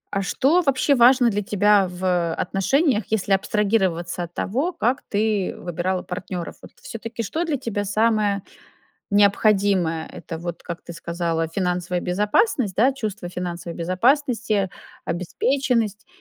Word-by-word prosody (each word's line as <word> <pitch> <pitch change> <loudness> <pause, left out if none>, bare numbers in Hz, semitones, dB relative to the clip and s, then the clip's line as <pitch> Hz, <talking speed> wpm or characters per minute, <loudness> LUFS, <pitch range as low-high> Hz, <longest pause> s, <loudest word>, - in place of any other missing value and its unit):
а 195 - +1
что 280 - +2
вообще 275 -1 +2
важно 245 -1 +5
для 205 - -1
тебя 205 -1 +3
в 180 -2 0
отношениях, 225 - +1
если 205 -2 -1
абстрагироваться 190 -4 0
от 170 0 -9
того, 275 - -1
как 250 -4 0
ты 210 -2 0
выбирала 180 +2 -2
партнёров. 180 -1 -5
Вот - - -12
всё-таки 230 +1 -6
что 320 - -2
для 305 -3 -1
тебя 220 -5 -3
самое 210 -1 +1 0.7
необходимое? 200 -5 +3
Это 165 -1 -7
вот, 170 0 -6
как 170 0 -6
ты 170 - -9
сказала, 165 -1 -2
финансовая 180 0 -1
безопасность, 210 - +1
да, 250 +6 +4
чувство 215 -8 -5
финансовой 175 -1 -5
безопасности, 225 - +1 0.4
обеспеченность? 225 +5 -1
200 Hz, 130 wpm, -23 LUFS, 180-230 Hz, 0.7 s, важно